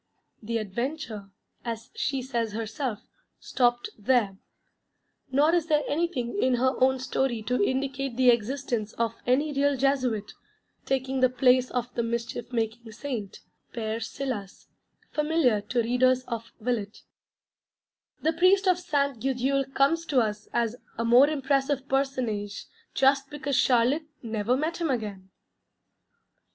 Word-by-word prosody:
The 230 +1 -2
adventure 225 0 -4 0.3
as 230 +1 -5
she 270 -2 -1
says 235 -4 -2
herself, 225 +1 -3 0.4
stopped 240 -2 +1
there. 210 -3 +2 1.0
Nor 295 +5 +4
is 340 -2 +2
there 300 -2 +3
anything 305 -1 -1
in 255 -1 +3
her 260 +2 +2
own 265 0 +4
story 255 -2 -1
to 250 -1 +1
indicate 270 0 -1
the 255 -1 +6
existence 235 -2 -1
of 230 -1 -1
any 290 +4 +2
real 280 0 +2
Jesuit, 255 -6 0 0.6
taking 265 0 0
the 255 0 +5
place 255 0 +3
of 245 0 -3
the 235 - 0
mischief 235 +1 -3
making 225 -1 -2
Saint, 235 -5 -5 0.3
Père 225 -1 -2
Silas, 230 -6 -5 0.4
familiar 300 -8 +2
to 235 +3 0
readers 255 +2 +3
of 230 -2 -6
Villette. 220 -3 -3 1.2
The 320 - +2
Priest 375 +4 +4
of 365 -1 +4
Ste. 280 -7 0
Gudule 270 +1 0
comes 330 +5 +2
to 275 -4 +3
us 210 -2 -1
as 235 -1 0 0.2
a 230 - -1
more 245 +5 +6
impressive 275 -1 0
personage 250 -7 -1 0.3
just 270 0 +3
because 285 -2 -3
Charlotte 255 +7 +3 0.2
_never 225 +2 0
met 315 +4 -1
him 335 -2 -1
again. 205 -7 -3
255 Hz, 135 wpm, -27 LUFS, 230-275 Hz, 1.2 s, the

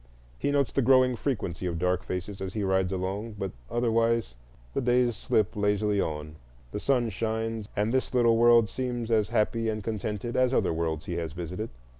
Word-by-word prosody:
He - - 0
notes 140 -2 +2
the 140 - +1
growing 130 0 +5
frequency 100 - -2
of 85 -2 -2
dark 90 +1 +1
faces 95 +2 -5
as 95 +1 -5
he 105 - -1
rides 95 -1 +1
along,—but 95 +2 -3 0.2
otherwise 115 - +1 0.4
the - - 0
days 120 -1 +2
slip 105 0 0
lazily 105 0 +1
on, 75 0 -4 0.3
the - - -3
sun 120 -2 +1
shines, 110 0 -2
and 105 +3 0
this 130 - 0
little 120 -2 +4
world 120 -1 +6
seems 120 -1 -3
as 105 -4 +2
happy 115 +1 +1
and 110 -1 -3
contented 105 +1 -3
as 130 0 +3
other - - +2
worlds 80 -1 -2
he 85 - -3
has 80 -2 -3
visited. 90 +6 -5
110 Hz, 180 wpm, -28 LUFS, 95-120 Hz, 0.4 s, world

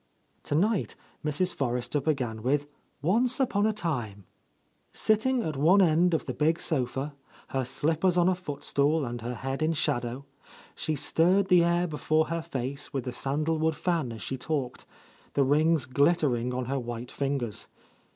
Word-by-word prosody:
Tonight 195 +8 0 0.3
Mrs, 155 +5 0
Forrester 125 +2 -1
began 125 -8 -1
with 140 +5 +1 0.4
"Once 240 - +3
upon 220 -6 +2
a - - +2
time," 120 - -3 0.7
Sitting 235 +3 +1
at 155 -5 -3
one 165 +9 +5
end 170 -1 +4
of 160 - -2
the 130 - -3
big 160 +4 +1
sofa, 135 0 -1 0.4
her 135 -1 -1
slippers 160 +8 +1
on 175 0 +4
a 185 - +4
foot 175 -6 -7
stool 145 +1 +1
and 120 -1 -5
her 120 +2 -4
head 135 +5 -4
in 160 +1 +2
shadow, 135 -4 -2 0.5
she 155 - -2
stirred 180 +7 +2
the 180 -2 +6
air 170 +1 +2
before 155 -1 0
her 165 0 -1
face 140 -4 -4
with 135 -3 -2
the 125 - -4
san 140 +4 -1
dalwood, 160 0 +1
fan 165 -9 -1
as 110 -2 -7
she 130 - -4
talked, 135 -4 -3 0.5
the 140 - +4
rings 150 +1 +3
glittering 130 -3 +2
on 125 0 -2
her 135 +2 -1
white 120 0 -6
fingers. 135 -6 -2
150 Hz, 165 wpm, -28 LUFS, 130-170 Hz, 0.7 s, the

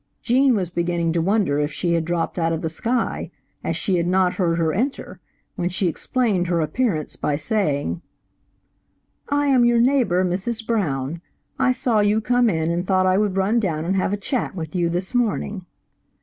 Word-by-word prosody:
Gene 255 +1 +3
was 180 -4 -2
beginning 170 -1 0
to 170 - +1
wonder 190 -5 +1
if 150 +1 0
she 170 +3 -1
had 165 -1 0
dropped 175 +1 -2
out 165 0 +1
of 165 0 -2
the 160 - -1
sky, 230 +9 -2 0.3
as - - -2
she 190 -4 0
had 170 0 0
not 185 0 +2
heard 170 -3 0
her 160 -2 +1
enter, 260 +7 -3 0.4
when 175 -3 -1
she 185 +1 -1
explained 200 0 0
her 170 -1 +1
appearance 160 - -1
by 150 - -1
saying 155 -3 -1 1.3
"I 290 0 +1
am 265 -3 +4
your 240 0 +4
neighbor, 235 -8 +3
Mrs. 205 +6 -2
Brown. 165 - -1 0.4
I 260 -1 +3
saw 250 -3 +1
you 205 +1 +3
come 245 +1 +2
in 160 -3 0
and 170 +1 -1
thought 185 0 +2
I 185 +1 +3
would 205 -3 0
run 200 +5 +2
down 165 -7 -2
and 190 +3 0
have 190 0 0
a 205 - 0
chat 220 +1 -3
with 160 -4 -6
you 175 -2 +1
this 180 +6 -3
morning." 210 -5 -1
185 Hz, 190 wpm, -22 LUFS, 170-225 Hz, 1.3 s, am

